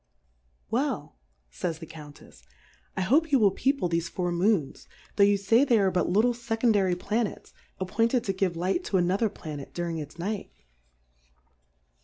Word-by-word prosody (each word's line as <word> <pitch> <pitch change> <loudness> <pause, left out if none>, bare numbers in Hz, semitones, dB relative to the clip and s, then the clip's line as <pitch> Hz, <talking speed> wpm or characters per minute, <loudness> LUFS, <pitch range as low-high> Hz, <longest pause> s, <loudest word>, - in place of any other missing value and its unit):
Well, - - -2 0.3
fays 160 - -3
the 165 - -9
Countefs^ 150 - -13 0.6
I - - 0
hope 295 - +2
you 275 - +6
will 205 -5 +4
People 270 0 0
thefe 170 0 -1
Four 180 -2 -2
Moons, 175 -4 0 0.3
tho' 200 - +5
yoii' 200 0 +4
fay 225 +6 +4
they 250 -5 +4
are 195 -2 +3
but 180 0 0
little 220 +7 +3
fecondary 225 -6 +1
Planets, 215 +4 -3 0.3
appointed 225 +6 +1
to 195 - -1
give 185 -3 -1
Light 185 - 0
to 195 - +1
a - - +3
nother 195 +5 +1
Planet 150 -7 -8
during 170 -2 -2
its 150 +2 -8
Night.. 200 +4 -4
190 Hz, 160 wpm, -27 LUFS, 170-225 Hz, 0.6 s, you